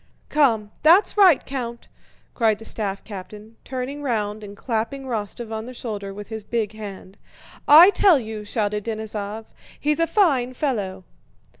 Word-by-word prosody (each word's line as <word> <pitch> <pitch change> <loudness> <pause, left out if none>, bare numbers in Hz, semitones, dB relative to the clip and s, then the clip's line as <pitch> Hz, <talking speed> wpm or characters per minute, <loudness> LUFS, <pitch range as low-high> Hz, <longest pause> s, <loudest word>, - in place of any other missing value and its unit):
"Come, 225 -8 +2
that's 340 +7 +5
right, 380 -8 +5
Count!" 240 -3 -5 0.5
cried 220 -3 +2
the 225 - -12
staff 200 -4 -4
captain, 210 +2 -10
turning 260 +3 -5
round 215 -5 -2
and 200 0 -10
clapping 230 +4 -3
Rostóv 225 -2 -5
on 220 +1 -5
the 255 - -9
shoulder 205 -5 -5
with 205 +1 -9
his 220 -1 -6
big 220 -1 -2
hand. 200 -2 -10 0.5
"I 330 +7 +9
tell 385 -6 +5
you," 220 -4 -6
shouted 210 -1 -2
Denísov, 220 -1 -5 0.3
"he's 300 +1 0
a 330 - +2
fine 270 - +2
fellow." 200 -10 -2
225 Hz, 150 wpm, -23 LUFS, 210-265 Hz, 0.5 s, I